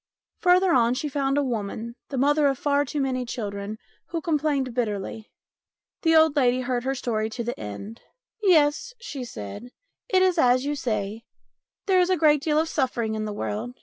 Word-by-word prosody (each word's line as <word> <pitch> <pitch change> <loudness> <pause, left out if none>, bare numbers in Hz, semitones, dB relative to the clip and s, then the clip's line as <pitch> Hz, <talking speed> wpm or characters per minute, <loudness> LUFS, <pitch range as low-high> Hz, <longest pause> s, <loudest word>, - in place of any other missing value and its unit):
Further 365 0 +4
on 240 -1 +3
she 300 +4 -2
found 275 -1 0
a 290 - +3
woman, 230 -1 -3 0.2
the 275 - -4
mother 290 +3 +3
of 270 -1 +1
far 285 +1 +1
too 290 +2 -4
many 260 -2 0
children, 205 -3 -5 0.3
who 335 - -3
complained 295 -5 0
bitterly. 220 -2 -3 0.7
The 325 -1 +3
old 315 -2 +5
lady 255 -2 +3
heard 245 -1 -1
her 270 +1 0
story 220 -4 -1
to 235 +2 -4
the 240 +1 -4
end. 110 - -7 0.2
" - - -69
Yes," 320 +3 +3
she 290 - -6
said, 155 - -8 0.2
" - - -57
it 375 -5 +4
is 365 -2 +2
as 255 -1 +4
you 290 - 0
say. 215 -5 -3 0.6
There 380 -2 +4
is 360 0 +3
a 370 - +3
great 300 -2 +4
deal 300 0 +1
of 320 +1 +2
suffering 250 -7 -1
in 215 0 -2
the 210 - -3
world. 215 +4 -4
260 Hz, 195 wpm, -25 LUFS, 230-300 Hz, 0.7 s, old